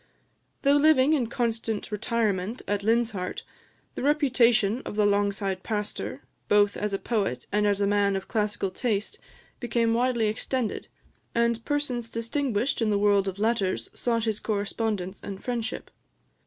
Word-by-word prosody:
Though 280 Hz, +1 st, +5 dB
living 295 Hz, -1 st, +5 dB
in 260 Hz, -7 st, +1 dB
constant 225 Hz, -2 st, -2 dB
retirement 210 Hz, -1 st, -1 dB
at 205 Hz, -1 st, 0 dB
Linshart, 220 Hz, -4 st, 0 dB, 0.5 s
the -, -, -5 dB
reputation 245 Hz, -6 st, +3 dB
of -, -, -6 dB
the 210 Hz, -1 st, +3 dB
Longside 200 Hz, -1 st, 0 dB
pastor, 210 Hz, 0 st, -4 dB, 0.2 s
both 205 Hz, -1 st, +4 dB
as 210 Hz, 0 st, -2 dB
a 195 Hz, -, 0 dB
poet 210 Hz, -2 st, -2 dB
and 210 Hz, 0 st, +2 dB
a 200 Hz, 0 st, +2 dB
man 200 Hz, -1 st, +2 dB
of 190 Hz, -, -4 dB
classical 210 Hz, -3 st, -1 dB
taste, 215 Hz, 0 st, -2 dB, 0.4 s
became 235 Hz, -2 st, +1 dB
widely 240 Hz, -1 st, +2 dB
extended, 220 Hz, +2 st, -2 dB, 0.5 s
and 235 Hz, -1 st, +1 dB
persons 265 Hz, -6 st, -2 dB
distinguished 240 Hz, +1 st, -1 dB
in 225 Hz, -, +2 dB
the 205 Hz, -, +2 dB
world 200 Hz, -1 st, +3 dB
of 190 Hz, 0 st, -3 dB
letters 200 Hz, -, 0 dB
sought 230 Hz, -2 st, 0 dB
his 220 Hz, -2 st, -1 dB
correspondence 205 Hz, -2 st, -2 dB
and 195 Hz, -1 st, -7 dB
friendship. 235 Hz, -2 st, -3 dB
220 Hz, 140 wpm, -27 LUFS, 205-240 Hz, 0.5 s, Though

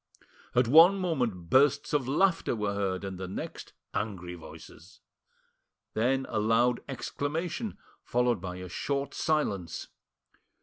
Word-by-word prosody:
At 125 Hz, -1 st, +4 dB
one 165 Hz, +9 st, +8 dB
moment 125 Hz, -, -2 dB
bursts 145 Hz, +2 st, +4 dB
of 140 Hz, -4 st, +1 dB
laughter 170 Hz, +1 st, +2 dB
were 105 Hz, -2 st, -1 dB
heard, 100 Hz, -2 st, -1 dB
and 95 Hz, -2 st, -5 dB
the 95 Hz, -, -4 dB
next 95 Hz, -, -7 dB, 0.2 s
angry 100 Hz, -4 st, -3 dB
voices. 85 Hz, -2 st, -13 dB, 0.9 s
Then 130 Hz, +4 st, +1 dB
a 110 Hz, -, -1 dB
loud 115 Hz, +3 st, +3 dB
exclamation, 165 Hz, -, -3 dB, 0.2 s
followed 120 Hz, -4 st, +1 dB
by 90 Hz, -1 st, -5 dB
a 90 Hz, 0 st, -7 dB
short 140 Hz, -, -2 dB
silence. 100 Hz, -, -1 dB
120 Hz, 125 wpm, -29 LUFS, 95-145 Hz, 0.9 s, one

